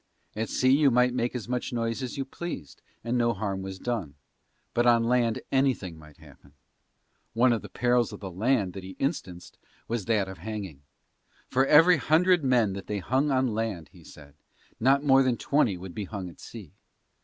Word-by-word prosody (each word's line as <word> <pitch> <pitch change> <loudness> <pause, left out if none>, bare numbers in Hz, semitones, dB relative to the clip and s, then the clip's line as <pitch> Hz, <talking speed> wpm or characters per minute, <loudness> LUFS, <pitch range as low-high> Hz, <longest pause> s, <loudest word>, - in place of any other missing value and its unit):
At 110 +1 -3
sea 130 0 +2
you 145 -1 +4
might 125 0 +3
make 120 0 -1
as 120 -3 -5
much 125 0 -3
noise 115 +1 -2
as 130 0 -5
you 135 - -2
pleased 135 - -7 0.2
and 120 +2 -1
no 120 0 +2
harm 100 -2 -3
was 95 0 -6
done, 100 -10 -4 0.6
but 120 +1 +2
on 120 -1 +5
land 120 -1 +1
anything 130 -10 0
might 75 -2 -16
happen. 70 - -18 0.8
One 120 +2 +4
of 115 - -2
the - - -10
perils 120 -1 +1
of 105 - -9
the 95 -3 -7
land 105 0 0
that 95 - -7
he 95 0 -9
instanced 95 - -4 0.3
was 115 -4 -3
that 105 -4 +1
of 95 -2 -9
hanging. 95 -7 -6 0.7
For 135 +1 +2
every 165 +4 +7
hundred 170 +3 +3
men 120 -6 +2
that 100 0 -8
they 105 - -2
hung 130 +10 0
on 130 -4 +1
land, 105 -7 -3
he - - -17
said, 70 -2 -15 0.5
not 135 +4 +3
more 135 -2 +5
than 130 -3 +1
twenty 120 -10 +1
would 90 0 -9
be 105 - -4
hung 95 -3 -6
at - - -20
sea. 105 -10 -11
115 Hz, 195 wpm, -27 LUFS, 95-130 Hz, 0.8 s, every